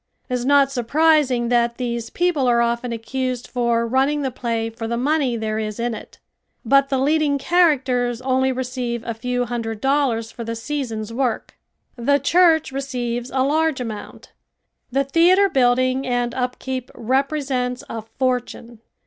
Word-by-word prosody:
It -, -, -3 dB
is 250 Hz, -1 st, -1 dB
not 280 Hz, 0 st, +4 dB
surprising 270 Hz, -1 st, +2 dB
that 235 Hz, -1 st, +2 dB
these 235 Hz, -2 st, -3 dB
people 345 Hz, -7 st, +1 dB
are 240 Hz, -1 st, +3 dB
often 235 Hz, +1 st, 0 dB
accused 250 Hz, +2 st, -3 dB
for 235 Hz, -2 st, 0 dB
running 270 Hz, +5 st, +1 dB
the 265 Hz, -, -1 dB
play 230 Hz, -2 st, -2 dB
for 225 Hz, 0 st, -6 dB
the 235 Hz, +1 st, -2 dB
money 270 Hz, -2 st, +1 dB
there 220 Hz, -1 st, -2 dB
is 215 Hz, 0 st, -4 dB
in 240 Hz, 0 st, -1 dB
it. 215 Hz, -, -10 dB, 0.5 s
But 275 Hz, +3 st, +4 dB
the 270 Hz, -, +1 dB
leading 290 Hz, +1 st, +2 dB
characters 260 Hz, -7 st, +2 dB
only 260 Hz, 0 st, +1 dB
receive 250 Hz, -2 st, -3 dB
a 230 Hz, -, -2 dB
few 245 Hz, +2 st, -2 dB
hundred 230 Hz, -2 st, -4 dB
dollars 265 Hz, -4 st, +1 dB
for 235 Hz, -, -7 dB
the 230 Hz, 0 st, -4 dB
season's 230 Hz, -4 st, -4 dB
work. 250 Hz, -1 st, -2 dB, 0.4 s
The 280 Hz, +4 st, +2 dB
church 320 Hz, +1 st, +3 dB
receives 250 Hz, -3 st, -3 dB
a 260 Hz, 0 st, +1 dB
large 310 Hz, +1 st, +1 dB
amount. 220 Hz, -4 st, -7 dB, 0.6 s
The 275 Hz, +2 st, +2 dB
theater 345 Hz, +8 st, +4 dB
building 255 Hz, -1 st, +2 dB
and 245 Hz, -1 st, 0 dB
upkeep 255 Hz, 0 st, -3 dB
represents 260 Hz, 0 st, -1 dB
a 225 Hz, -, -5 dB
fortune. 240 Hz, 0 st, -3 dB
250 Hz, 155 wpm, -21 LUFS, 235-275 Hz, 0.6 s, not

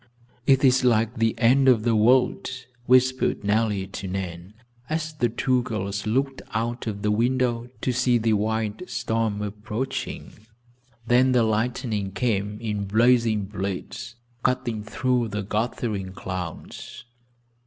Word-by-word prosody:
"It 135 Hz, 0 st, +5 dB
is 130 Hz, 0 st, +4 dB
like 115 Hz, -1 st, +2 dB
the 115 Hz, -1 st, +1 dB
end 130 Hz, +3 st, +5 dB
of 115 Hz, -4 st, +4 dB
the 115 Hz, -1 st, +2 dB
world," 125 Hz, +4 st, +3 dB, 0.4 s
whispered 130 Hz, -2 st, +3 dB
Nellie 105 Hz, -1 st, +1 dB
to 95 Hz, 0 st, -7 dB
Nan, 90 Hz, 0 st, -5 dB, 0.3 s
as 155 Hz, 0 st, -2 dB
the 125 Hz, -6 st, 0 dB
two 125 Hz, +2 st, +1 dB
girls 100 Hz, -3 st, -3 dB
looked 135 Hz, +4 st, 0 dB
out 120 Hz, +2 st, -2 dB
of 100 Hz, -1 st, -4 dB
the 105 Hz, -, +2 dB
window 120 Hz, +1 st, +1 dB
to 130 Hz, -, 0 dB
see 125 Hz, 0 st, +2 dB
the 115 Hz, -1 st, +1 dB
wild 110 Hz, -, -1 dB
storm 110 Hz, -2 st, -1 dB
approaching. 105 Hz, +5 st, -4 dB, 0.7 s
Then 125 Hz, +2 st, +4 dB
the 120 Hz, -2 st, +4 dB
lightning 110 Hz, -2 st, -1 dB
came 105 Hz, -3 st, -1 dB
in 105 Hz, -3 st, -3 dB
blazing 115 Hz, 0 st, +3 dB
blades, 100 Hz, +4 st, -5 dB, 0.3 s
cutting 120 Hz, -4 st, -1 dB
through 125 Hz, +2 st, 0 dB
the 105 Hz, -1 st, -3 dB
gathering 105 Hz, -2 st, -2 dB
clouds. 90 Hz, +6 st, -7 dB
115 Hz, 130 wpm, -25 LUFS, 105-125 Hz, 0.7 s, It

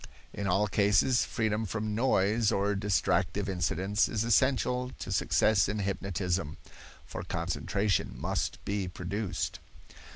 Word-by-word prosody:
In 100 Hz, -, -3 dB
all 95 Hz, +3 st, +3 dB
cases, 105 Hz, +5 st, +3 dB
freedom 110 Hz, -1 st, -1 dB
from 110 Hz, +1 st, -3 dB
noise 110 Hz, -2 st, +2 dB
or 100 Hz, +1 st, +1 dB
distractive 100 Hz, 0 st, 0 dB
incidents 95 Hz, +2 st, 0 dB
is 110 Hz, -1 st, -1 dB
essential 125 Hz, +1 st, +2 dB
to -, -, -6 dB
success 105 Hz, -4 st, +3 dB
in 105 Hz, -, -2 dB
hypnotism, 95 Hz, -4 st, -2 dB, 0.5 s
for -, -, -6 dB
concentration 100 Hz, 0 st, -1 dB
must -, -, -2 dB
be 100 Hz, -2 st, -1 dB
produced. 95 Hz, +3 st, -3 dB
100 Hz, 120 wpm, -30 LUFS, 95-110 Hz, 0.5 s, all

